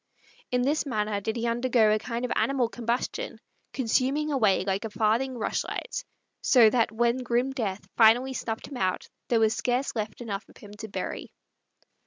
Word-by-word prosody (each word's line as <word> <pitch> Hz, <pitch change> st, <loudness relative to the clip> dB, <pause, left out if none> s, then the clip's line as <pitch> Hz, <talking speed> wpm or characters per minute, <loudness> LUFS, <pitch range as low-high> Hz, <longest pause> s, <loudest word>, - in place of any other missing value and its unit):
In 250 Hz, 0 st, +1 dB
this 290 Hz, +3 st, +1 dB
manner 210 Hz, -4 st, -1 dB
did 220 Hz, +3 st, -2 dB
he 235 Hz, 0 st, -2 dB
undergo 235 Hz, -2 st, +3 dB
a 215 Hz, -, +1 dB
kind 235 Hz, +2 st, -3 dB
of 250 Hz, -, -4 dB
animal 260 Hz, -4 st, +1 dB
combustion, 240 Hz, -, -3 dB, 0.3 s
consuming 270 Hz, +4 st, 0 dB
away 215 Hz, -10 st, +3 dB
like 195 Hz, 0 st, -1 dB
a 225 Hz, -, -3 dB
farthing 230 Hz, +5 st, 0 dB
rush 220 Hz, -, -1 dB
light; -, -, -4 dB, 0.4 s
so 230 Hz, -5 st, +6 dB
that 230 Hz, -2 st, +2 dB
when 235 Hz, +2 st, +1 dB
grim 250 Hz, +1 st, 0 dB
death 205 Hz, -8 st, -3 dB
finally 245 Hz, +4 st, +5 dB
snuffed 225 Hz, -3 st, -4 dB
him 275 Hz, -, -7 dB
out 185 Hz, -3 st, -1 dB, 0.2 s
there 235 Hz, -, +2 dB
was 220 Hz, 0 st, +3 dB
scarce 250 Hz, +2 st, -1 dB
left 215 Hz, -1 st, -4 dB
enough 205 Hz, -4 st, -5 dB
of -, -, -17 dB
him 205 Hz, -, -13 dB
to 220 Hz, -, -6 dB
bury. 200 Hz, -, -5 dB
235 Hz, 180 wpm, -27 LUFS, 215-255 Hz, 0.4 s, so